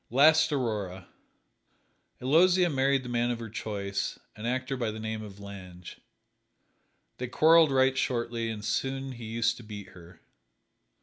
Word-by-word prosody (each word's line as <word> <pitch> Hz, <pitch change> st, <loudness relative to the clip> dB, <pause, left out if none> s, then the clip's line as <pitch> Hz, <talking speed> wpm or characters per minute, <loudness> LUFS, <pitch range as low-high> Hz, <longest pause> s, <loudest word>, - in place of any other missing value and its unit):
East 155 Hz, +4 st, +5 dB
Aurora: 105 Hz, -9 st, -2 dB, 1.1 s
Aloysia 175 Hz, +6 st, +4 dB
married 135 Hz, -1 st, +2 dB
the -, -, -8 dB
man 120 Hz, 0 st, 0 dB
of 120 Hz, -, -1 dB
her 115 Hz, -2 st, -8 dB
choice 100 Hz, -3 st, -3 dB, 0.2 s
an 105 Hz, +2 st, -5 dB
actor 130 Hz, +2 st, -1 dB
by 120 Hz, -3 st, -1 dB
the 110 Hz, +1 st, -6 dB
name 110 Hz, 0 st, -4 dB
of 100 Hz, -2 st, -10 dB
Lange. 95 Hz, -3 st, -10 dB, 1.2 s
They 125 Hz, -, -3 dB
quarreled 160 Hz, +5 st, +5 dB
right 130 Hz, -1 st, +3 dB
shortly, 120 Hz, -3 st, -1 dB
and 105 Hz, -2 st, -5 dB
soon 135 Hz, +4 st, -2 dB
he 120 Hz, -2 st, -8 dB
used 115 Hz, +1 st, 0 dB
to 120 Hz, -, -11 dB
beat 105 Hz, -2 st, -9 dB
her. 90 Hz, -2 st, -15 dB
120 Hz, 145 wpm, -28 LUFS, 105-135 Hz, 1.2 s, East